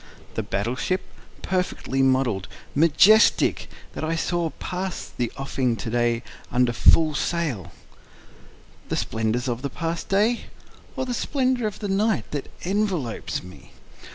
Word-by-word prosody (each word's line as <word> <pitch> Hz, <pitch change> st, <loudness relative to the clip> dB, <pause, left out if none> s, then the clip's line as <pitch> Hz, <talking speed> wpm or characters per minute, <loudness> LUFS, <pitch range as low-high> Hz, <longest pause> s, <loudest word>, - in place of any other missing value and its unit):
The -, -, -1 dB
battle 105 Hz, +3 st, -2 dB
ship, 185 Hz, +7 st, 0 dB, 0.4 s
perfect 185 Hz, -1 st, -1 dB
model'd, 130 Hz, -7 st, +2 dB, 0.3 s
majestic, 170 Hz, +8 st, +5 dB, 0.2 s
that -, -, -5 dB
I 160 Hz, +1 st, 0 dB
saw 170 Hz, 0 st, 0 dB
pass 185 Hz, 0 st, -4 dB
the 120 Hz, -2 st, -1 dB
offing 130 Hz, -3 st, 0 dB
to 115 Hz, -, -5 dB
day 120 Hz, 0 st, +1 dB, 0.3 s
under 125 Hz, -1 st, +3 dB
full 155 Hz, +6 st, +5 dB
sail? 130 Hz, -, -2 dB, 1.2 s
The -, -, 0 dB
splendors 110 Hz, +3 st, -1 dB
of 120 Hz, -1 st, -2 dB
the 140 Hz, -, -2 dB
past 165 Hz, +1 st, -4 dB
day? 215 Hz, +5 st, +2 dB, 0.5 s
Or 260 Hz, -, -1 dB
the 250 Hz, -, -2 dB
splendor 255 Hz, -2 st, 0 dB
of 210 Hz, -, -5 dB
the 205 Hz, -, -4 dB
night 205 Hz, +3 st, +1 dB
that 145 Hz, -2 st, -4 dB
envelopes 185 Hz, -, -1 dB
me? 90 Hz, +1 st, -14 dB
150 Hz, 135 wpm, -24 LUFS, 120-190 Hz, 1.2 s, majestic